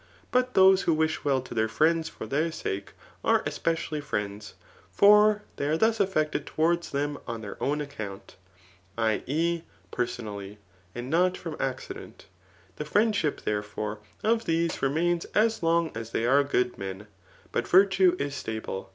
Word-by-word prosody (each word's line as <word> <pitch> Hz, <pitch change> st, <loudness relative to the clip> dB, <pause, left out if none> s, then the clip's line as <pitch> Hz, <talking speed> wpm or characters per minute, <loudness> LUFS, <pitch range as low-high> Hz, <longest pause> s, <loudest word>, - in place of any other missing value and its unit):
But 250 Hz, 0 st, +1 dB
those 190 Hz, 0 st, +7 dB
who 165 Hz, -, +2 dB
wish 160 Hz, 0 st, 0 dB
well 135 Hz, -2 st, +2 dB
to 130 Hz, -, -9 dB
their 110 Hz, -1 st, +1 dB
friends 160 Hz, +7 st, +2 dB
for -, -, -8 dB
their 155 Hz, +4 st, 0 dB
sake, 100 Hz, -10 st, -4 dB, 0.3 s
are -, -, +3 dB
especially 165 Hz, -2 st, -2 dB
friends; 105 Hz, -6 st, -4 dB, 0.4 s
for 210 Hz, +1 st, +6 dB
they 140 Hz, -, -1 dB
are 155 Hz, +2 st, +1 dB
thus 220 Hz, +3 st, +2 dB
aflFected 155 Hz, -7 st, 0 dB
towards 170 Hz, +2 st, 0 dB
them 145 Hz, +1 st, -2 dB
on 115 Hz, -2 st, -4 dB
their 105 Hz, -, -7 dB
own 150 Hz, +2 st, 0 dB
account, 110 Hz, -9 st, -7 dB, 0.6 s
£i. 110 Hz, -1 st, +1 dB
e. 165 Hz, +4 st, 0 dB, 0.3 s
per* 125 Hz, -, 0 dB
sonally,] 105 Hz, -4 st, -7 dB, 0.4 s
and 120 Hz, +2 st, -5 dB
not 180 Hz, +2 st, +3 dB
from 165 Hz, -3 st, -6 dB
accident. 130 Hz, 0 st, -5 dB, 0.5 s
The -, -, -3 dB
friendship, 205 Hz, -3 st, +1 dB
there 105 Hz, -1 st, -1 dB
fore, 105 Hz, 0 st, -5 dB, 0.2 s
of 225 Hz, +1 st, +2 dB
these 165 Hz, 0 st, 0 dB
remains 170 Hz, +5 st, +1 dB
as 220 Hz, +1 st, +3 dB
long 165 Hz, 0 st, +2 dB
as 115 Hz, -1 st, -6 dB
they 115 Hz, -, -1 dB
are 140 Hz, +3 st, +5 dB
good 125 Hz, -3 st, 0 dB
men 95 Hz, +1 st, -6 dB, 0.2 s
} -, -, -28 dB
but 120 Hz, -, -1 dB
virtue 185 Hz, -1 st, +5 dB
is 140 Hz, -2 st, -3 dB
stable. 110 Hz, -7 st, -5 dB
150 Hz, 165 wpm, -27 LUFS, 115-170 Hz, 0.6 s, those